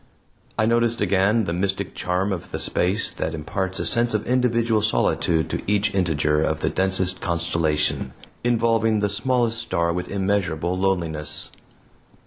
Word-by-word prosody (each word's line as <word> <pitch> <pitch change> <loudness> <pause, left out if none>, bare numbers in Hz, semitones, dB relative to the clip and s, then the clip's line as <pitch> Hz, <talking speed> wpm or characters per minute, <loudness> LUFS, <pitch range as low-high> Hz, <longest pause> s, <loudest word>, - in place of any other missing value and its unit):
I 110 - +3
noticed 115 0 +2
again 100 +4 +2
the 85 - -2
mystic 95 +1 -2
charm 95 +2 -1
of 95 0 -5
space 95 +5 +1
that 80 +1 -3
imparts 95 +5 -3
a - - -1
sense 120 -1 +2
of 105 - -1
individual 115 -3 +2
solitude 85 -6 +1
to - - -2
each 105 0 +1
integer 75 -5 +1
of 80 0 -1
the - - +1
densest 95 -1 +1
constellation, 85 -3 0 0.3
involving 115 -2 +2
the 105 - +1
smallest 115 +2 +1
star 85 -7 0
with 90 +1 -4
immeasurable 95 -4 -1
loneliness. 85 -5 -2
95 Hz, 140 wpm, -23 LUFS, 85-110 Hz, 0.3 s, I